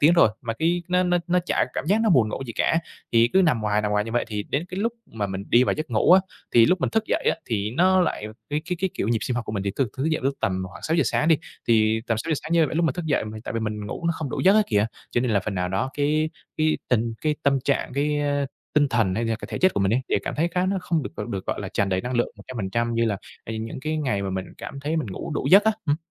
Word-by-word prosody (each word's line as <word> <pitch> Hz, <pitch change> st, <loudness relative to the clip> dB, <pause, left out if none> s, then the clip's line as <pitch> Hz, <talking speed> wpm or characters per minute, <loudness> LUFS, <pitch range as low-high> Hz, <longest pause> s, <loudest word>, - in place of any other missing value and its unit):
tiếng 155 Hz, +4 st, +6 dB
rồi 170 Hz, -, +6 dB
mà 115 Hz, -2 st, -2 dB
cái 170 Hz, +7 st, 0 dB
nó 180 Hz, 0 st, +3 dB
nó 175 Hz, -1 st, +2 dB
nó 180 Hz, 0 st, +3 dB
chả -, -, +2 dB
cảm -, -, -2 dB
giác 205 Hz, +5 st, +3 dB
nó 220 Hz, -, +3 dB
buồn 125 Hz, -10 st, +4 dB
ngủ 135 Hz, -, -4 dB
gì 115 Hz, -, -5 dB
cả. 165 Hz, -, +2 dB, 0.3 s
Thì 115 Hz, 0 st, +5 dB
cứ 190 Hz, 0 st, +5 dB
nằm 150 Hz, -10 st, +2 dB
hoài, 105 Hz, 0 st, +1 dB
nằm 105 Hz, -, -1 dB
hoài 105 Hz, 0 st, +2 dB
như 115 Hz, -, -6 dB
vậy, 120 Hz, -, +1 dB
thì 105 Hz, -1 st, -3 dB
đến 145 Hz, +9 st, -2 dB
cái 185 Hz, +2 st, -4 dB
lúc 230 Hz, +2 st, 0 dB
mà 105 Hz, -3 st, -3 dB
mình 95 Hz, 0 st, -5 dB
đi 125 Hz, +2 st, +5 dB
vào -, -, +1 dB
giấc 155 Hz, -3 st, -5 dB
ngủ 115 Hz, +10 st, +4 dB
á, 190 Hz, -, +8 dB, 0.3 s
thì 115 Hz, -1 st, +7 dB
lúc 185 Hz, -1 st, +2 dB
mình -, -, 0 dB
thức 220 Hz, 0 st, +1 dB
dậy -, -, -1 dB
á, -, -, -2 dB
thì 105 Hz, -2 st, -1 dB
nó 185 Hz, +8 st, +4 dB
lại 170 Hz, -11 st, -1 dB, 0.2 s
cái 150 Hz, +1 st, 0 dB
cái 180 Hz, 0 st, -2 dB
cái, 190 Hz, -2 st, 0 dB
kiểu, 105 Hz, -, -2 dB
nhịp 115 Hz, -1 st, +2 dB
sinh 125 Hz, -, -1 dB
học 120 Hz, -, -2 dB
của 110 Hz, -, -5 dB
mình 100 Hz, -2 st, -2 dB
thì 100 Hz, -, -1 dB
thức 135 Hz, -4 st, +1 dB
thức 130 Hz, -, -2 dB
dậy 160 Hz, 0 st, +1 dB
vào -, -, -10 dB
lúc 135 Hz, 0 st, +1 dB
tầm 95 Hz, -1 st, 0 dB
khoảng -, -, -12 dB
6:00 165 Hz, 0 st, +2 dB
sáng 150 Hz, +6 st, +1 dB
đi, 160 Hz, -, +6 dB, 0.3 s
thì 110 Hz, -1 st, +3 dB
tầm 115 Hz, -, +1 dB
6:00 160 Hz, +6 st, -1 dB
sáng 155 Hz, -, -5 dB
như 165 Hz, -2 st, +4 dB
vậy -, -, -5 dB
lúc 170 Hz, -, +2 dB
mà -, -, +2 dB
thức 175 Hz, -1 st, -5 dB
dậy 145 Hz, -, +1 dB
m 110 Hz, 0 st, -7 dB
tại -, -, -5 dB
vì 115 Hz, -, -1 dB
mình 105 Hz, -1 st, -3 dB
ngủ 170 Hz, -, -4 dB
nó 170 Hz, -, +3 dB
không 155 Hz, -4 st, -4 dB
đủ -, -, -2 dB
giấc 190 Hz, +3 st, +5 dB
á 215 Hz, -, +6 dB
kìa, 105 Hz, 0 st, +2 dB, 0.2 s
cho 120 Hz, -, +1 dB
nên 125 Hz, -1 st, 0 dB
là 100 Hz, -2 st, +3 dB
phần 100 Hz, +2 st, -4 dB
nào 90 Hz, -1 st, -1 dB
đó 125 Hz, +8 st, 0 dB
cái 155 Hz, +2 st, +1 dB, 0.3 s
cái 155 Hz, 0 st, +2 dB
tình 115 Hz, -1 st, +1 dB
cái 155 Hz, -1 st, +1 dB
tâm 140 Hz, -1 st, +3 dB
trạng, 140 Hz, -2 st, 0 dB
cái 145 Hz, +1 st, +1 dB, 0.6 s
tinh 145 Hz, -1 st, +4 dB
thần 115 Hz, -7 st, +1 dB
hay 115 Hz, -, -1 dB
là 115 Hz, -1 st, 0 dB
cái -, -, -9 dB
thể -, -, -3 dB
chất 185 Hz, 0 st, +3 dB
của -, -, +1 dB
mình 100 Hz, +2 st, +2 dB
ấy, 125 Hz, -, +2 dB
đều -, -, +2 dB
cảm -, -, -4 dB
thấy 165 Hz, +3 st, +1 dB
khá 180 Hz, +2 st, 0 dB
nó 195 Hz, +1 st, 0 dB
không 165 Hz, -4 st, 0 dB
được, -, -, -5 dB
ờ, -, -, -3 dB
được, 95 Hz, -2 st, -4 dB
gọi -, -, -2 dB
là, -, -, -4 dB
tràn 100 Hz, -, 0 dB
đầy 95 Hz, -1 st, 0 dB
năng 125 Hz, +5 st, -4 dB
lượng 120 Hz, -, +2 dB
100% 115 Hz, +1 st, -3 dB
như 115 Hz, 0 st, +2 dB
là, 105 Hz, -3 st, 0 dB, 0.3 s
ờ, 110 Hz, -, -5 dB
những 115 Hz, +3 st, -6 dB
cái 155 Hz, +2 st, -2 dB
ngày 130 Hz, -10 st, -1 dB
mà 95 Hz, -, -2 dB
mình 95 Hz, 0 st, -3 dB
cảm 140 Hz, -, -7 dB
thấy 155 Hz, +3 st, -1 dB
mình 155 Hz, -, -1 dB
ngủ 95 Hz, -, -6 dB
đủ -, -, -2 dB
giấc 200 Hz, +3 st, +8 dB
á, 220 Hz, -, +4 dB
ừm. 145 Hz, +1 st, +2 dB
130 Hz, 320 wpm, -24 LUFS, 110-165 Hz, 0.6 s, á